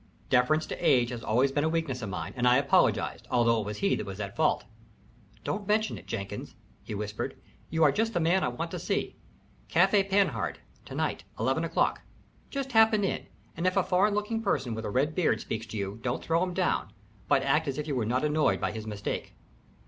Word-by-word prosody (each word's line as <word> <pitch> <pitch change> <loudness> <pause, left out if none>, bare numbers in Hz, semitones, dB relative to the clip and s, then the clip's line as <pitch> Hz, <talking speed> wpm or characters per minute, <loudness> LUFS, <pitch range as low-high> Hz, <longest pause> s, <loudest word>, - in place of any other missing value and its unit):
Deference 155 +6 +3
to - - -5
age 125 -2 +4
has 120 -2 -6
always 125 +5 +2
been 145 +1 0
a 160 - +2
weakness 160 -6 -1
of 105 - -4
mine, 95 - -5
and 125 -1 +1
I 125 +1 +6
apologized, 140 0 +2
although 115 -2 +3
it 105 - -6
was 105 0 -4
he 200 - +2
that - - -4
was 95 +1 -7
at 100 -1 -5
fault. 155 -1 +2 0.8
"Don't 200 -1 -3
mention 215 +1 +1
it, - - -12
Jenkins," 100 -3 -5 0.3
he 105 - -6
whispered. 105 0 -4 0.3
"You 160 0 +2
are 145 - +6
just 225 +6 -1
the - - +3
man 175 +3 +3
I - - +2
want 120 0 -4
to - - -4
see. - - -2 0.5
Café 195 +3 +4
Panhard 195 0 +1 0.3
to - - -8
night - - -1 0.2
eleven - - +1
o'clock. - - +1 0.5
Just 275 -2 -4
happen 220 -2 +5
in, 195 - -2 0.3
and 170 +3 0
if 185 - +1
a 195 - +4
foreign 195 +4 +2
looking 210 +2 -1
person 135 - 0
with 110 0 -5
a - - -2
red 135 +8 +1
beard 155 -11 +2
speaks 110 0 -4
to 110 - -6
you 100 +2 -4
don't 120 0 -2
throw 165 +1 +1
him 180 -1 -1
down, - - 0 0.4
but - - +3
act - - +2
as 140 - -2
if 150 0 -3
you 145 - -1
were 120 - 0
not 125 +5 0
annoyed 150 - +2
by - - -1
his 110 0 -7
mistake." 105 -1 -4
140 Hz, 220 wpm, -29 LUFS, 115-185 Hz, 0.8 s, I